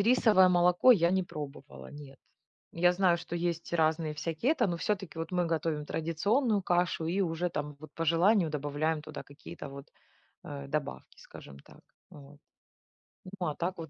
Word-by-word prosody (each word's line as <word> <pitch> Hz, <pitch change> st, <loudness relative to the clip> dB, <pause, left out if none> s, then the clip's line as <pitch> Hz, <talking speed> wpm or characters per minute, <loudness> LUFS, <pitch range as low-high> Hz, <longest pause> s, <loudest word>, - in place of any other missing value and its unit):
рисовое 210 Hz, -4 st, +5 dB
молоко 180 Hz, +7 st, +5 dB
я 170 Hz, -6 st, +3 dB
не 190 Hz, 0 st, +2 dB
пробовала, 145 Hz, -4 st, -9 dB
нет. 145 Hz, -2 st, -12 dB, 0.5 s
Я 175 Hz, +1 st, +3 dB
знаю, 180 Hz, -1 st, +3 dB
что 170 Hz, 0 st, -7 dB
есть 170 Hz, -1 st, -3 dB
разные 160 Hz, -1 st, +1 dB
всякие 165 Hz, -, -1 dB
это, 255 Hz, -8 st, +1 dB
но 175 Hz, -3 st, -2 dB
всё-таки 190 Hz, -2 st, -3 dB
вот 165 Hz, +3 st, -5 dB
мы 180 Hz, -1 st, +1 dB
готовим 160 Hz, -2 st, -2 dB
традиционную 200 Hz, -, 0 dB
кашу 175 Hz, -2 st, 0 dB
и 185 Hz, +4 st, 0 dB
уже 170 Hz, 0 st, -1 dB
там 150 Hz, -3 st, -5 dB
вот, 155 Hz, -, -11 dB
по 165 Hz, -, -2 dB
желанию, 170 Hz, +2 st, +3 dB
добавляем 150 Hz, +2 st, -1 dB
туда 155 Hz, 0 st, -8 dB
какие-то 140 Hz, 0 st, -10 dB
вот, 140 Hz, +2 st, -10 dB, 0.6 s
э, 140 Hz, -3 st, -7 dB
добавки, 140 Hz, -, -4 dB
скажем 70 Hz, -1 st, -13 dB
так, -, -, -18 dB, 0.3 s
вот. 145 Hz, 0 st, -14 dB, 1.0 s
Ну, 175 Hz, -, -1 dB
а 150 Hz, -, -2 dB
так 180 Hz, +2 st, -3 dB
вот 165 Hz, -2 st, -7 dB
165 Hz, 170 wpm, -30 LUFS, 150-180 Hz, 1.0 s, рисовое